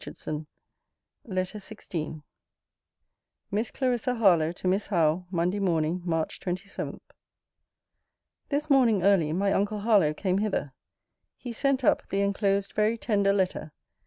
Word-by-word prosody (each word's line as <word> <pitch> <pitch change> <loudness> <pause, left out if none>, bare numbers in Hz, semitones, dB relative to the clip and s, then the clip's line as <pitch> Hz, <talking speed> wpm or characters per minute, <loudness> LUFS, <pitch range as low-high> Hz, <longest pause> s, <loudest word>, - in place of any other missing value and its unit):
HARLOWE. 155 0 -6 0.8
LETTER 185 -1 -3
XVI 165 -7 -6 1.3
MISS 215 +3 0
CLARISSA 250 -1 0
HARLOWE, 175 -8 +4
TO 185 - -5
MISS 195 +3 +1
HOWE 175 -1 +1
MONDAY 180 +2 0
MORNING, 170 -2 0
MARCH 165 -2 -1
27. 185 +2 -5 1.5
This 295 +1 -1
morning 245 - +4
early 185 -6 +4
my 195 +4 +1
uncle 205 +1 0
Harlowe 200 -9 +3
came 185 +2 0
hither. 200 -10 -2 0.6
He 245 -2 -7
sent 275 +2 +1
up - - +2
the 195 - 0
enclosed 200 0 0
very 215 +2 +1
tender 200 -3 +1
letter. 185 -5 -1
195 Hz, 125 wpm, -27 LUFS, 175-215 Hz, 1.5 s, HARLOWE